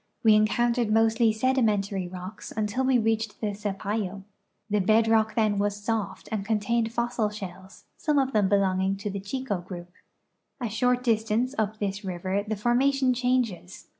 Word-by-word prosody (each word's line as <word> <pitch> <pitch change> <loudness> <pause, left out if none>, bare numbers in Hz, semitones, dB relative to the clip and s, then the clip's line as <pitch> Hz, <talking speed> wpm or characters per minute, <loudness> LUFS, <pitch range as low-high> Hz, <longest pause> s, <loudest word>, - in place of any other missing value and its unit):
We 220 -2 +7
encountered 235 +2 +2
mostly 225 +1 +4
sedimentary 215 -6 +1
rocks 185 +3 -8
until 215 +4 -1
we 260 -1 +4
reached 225 -2 -1
the 210 -2 -2
Sapayo. 200 -1 -3 0.4
The 210 -1 +1
bed 220 +4 +3
rock 220 -1 +2
then 215 -3 +2
was 205 0 0
soft 205 -2 -3
and 215 -3 -1
contained 225 +2 0
fossil 235 -2 0
shells, 190 -1 -9
some 300 -1 0
of 270 -1 +1
them 205 -3 +3
belonging 190 -1 +2
to 205 +1 -4
the 200 - -4
Chico 205 0 -3
group. 175 -1 -9 0.7
A 240 -3 -2
short 250 +3 +1
distance 225 +2 +1
up 215 0 -1
this 200 0 -3
river 185 +1 -2
the 215 +1 -3
formation 255 +4 +2
changes. 245 -7 -1
215 Hz, 160 wpm, -26 LUFS, 200-235 Hz, 0.7 s, We